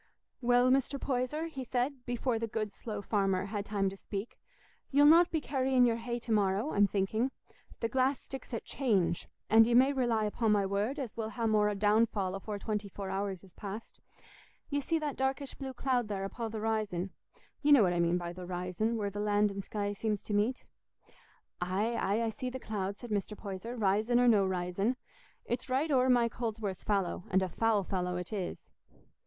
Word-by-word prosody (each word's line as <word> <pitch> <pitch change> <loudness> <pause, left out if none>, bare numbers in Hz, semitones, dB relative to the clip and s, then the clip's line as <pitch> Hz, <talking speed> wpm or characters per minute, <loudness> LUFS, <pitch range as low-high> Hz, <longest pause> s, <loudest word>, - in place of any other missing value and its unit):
"Well, 245 +1 +4
Mr. 275 +1 +1
Poyser," 265 +5 -1
he 275 -5 -6
said, 250 +2 -2
before 245 -1 0
the 230 - -2
good 215 -2 -3
slow 210 -3 -6
farmer 195 -2 +1
had 205 0 -4
time 200 -2 0
to - - -8
speak, 200 +2 -6 0.5
"ye'll 285 +1 +5
not 335 +3 +7
be 320 - 0
carrying 260 -3 +2
your 230 -1 +2
hay 235 +1 -3
to 235 - -6
morrow, 205 +5 +2
I'm 205 0 +5
thinking. 210 +6 0 0.5
The 230 - +1
glass 265 +2 +1
sticks 270 0 -8
at 230 - -4
'change,' 200 - 0 0.2
and 225 +1 +7
ye 235 - +3
may 265 +3 +6
rely 240 -5 +1
upo' 220 +2 0
my 205 -2 +3
word 205 +8 -1
as 260 -6 -5
we'll 220 -1 -3
ha' 230 0 -3
more 210 -1 +3
downfall 205 -2 +2
afore 205 +2 -4
twenty 210 0 -3
four 195 0 -6
hours 195 -1 -3
is 190 - -17
past. 210 +2 -8 0.7
Ye 285 0 +1
see 325 +4 0
that 300 -3 -3
darkish 265 +1 -1
blue 270 -1 -6
cloud 255 -2 0
there 200 -2 -3
upo' 225 +3 -4
the 220 -1 -5
'rizon—ye 215 - -3
know 275 -7 +8
what 180 -2 +2
I 175 - 0
mean 170 +1 +3
by 175 -1 -4
the 180 0 -8
'rizon, 180 +5 -1
where 205 -2 -2
the 205 - -5
land 205 0 +2
and 195 0 -5
sky 205 0 -2
seems 210 0 -2
to 210 - -4
meet?" 215 +5 +1 1.0
"Aye, 195 +6 0
aye, 210 +1 +1
I 225 - 0
see 255 +3 -4
the 260 +1 -6
cloud," 200 -4 -3
said 240 0 -9
Mr. 210 0 -2
Poyser, 210 +4 -6
"'rizon 215 +3 +2
or 245 - +4
no 205 -5 +5
'rizon. 185 +6 0 0.5
It's 240 +2 -3
right 280 +5 +1
o'er 260 -1 +4
Mike 240 -2 +3
Holdsworth's 220 -5 -3
fallow, 195 -4 0
and 190 -1 +3
a - - 0
foul 220 +2 +2
fallow 180 -1 -2
it 180 +4 -5
is." 190 -4 -5
215 Hz, 200 wpm, -32 LUFS, 195-245 Hz, 1.0 s, know